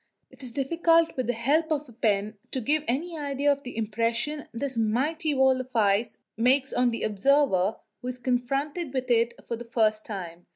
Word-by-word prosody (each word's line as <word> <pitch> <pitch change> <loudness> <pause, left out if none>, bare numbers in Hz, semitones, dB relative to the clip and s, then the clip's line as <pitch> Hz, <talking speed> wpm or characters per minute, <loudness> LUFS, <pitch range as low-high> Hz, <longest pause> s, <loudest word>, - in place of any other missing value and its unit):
It - - -16
is 255 -2 -4
difficult 330 +5 +2
with 255 -2 -2
the 245 - +1
help 290 +8 +1
of 300 -1 0
the 245 - -16
pen 215 -2 0
to 260 - -2
give 295 +6 +1
any 320 +7 -2
idea 285 0 +1
of 280 0 -1
the 250 -4 -8
impression 230 +7 -1
this 260 +2 -4
mighty 280 +8 0
wall 265 -1 +4
of 255 0 -12
ice 210 +1 +2 0.2
makes 260 +4 +2
on 250 0 +3
the 230 - -3
observer 215 -2 +2 0.3
who 245 - -6
is 250 0 -3
confronted 270 +5 -2
with 255 -1 -1
it 235 0 +3
for 235 - -2
the 240 - -8
first 215 -2 +1
time. 175 -4 -7
250 Hz, 195 wpm, -27 LUFS, 230-285 Hz, 0.3 s, wall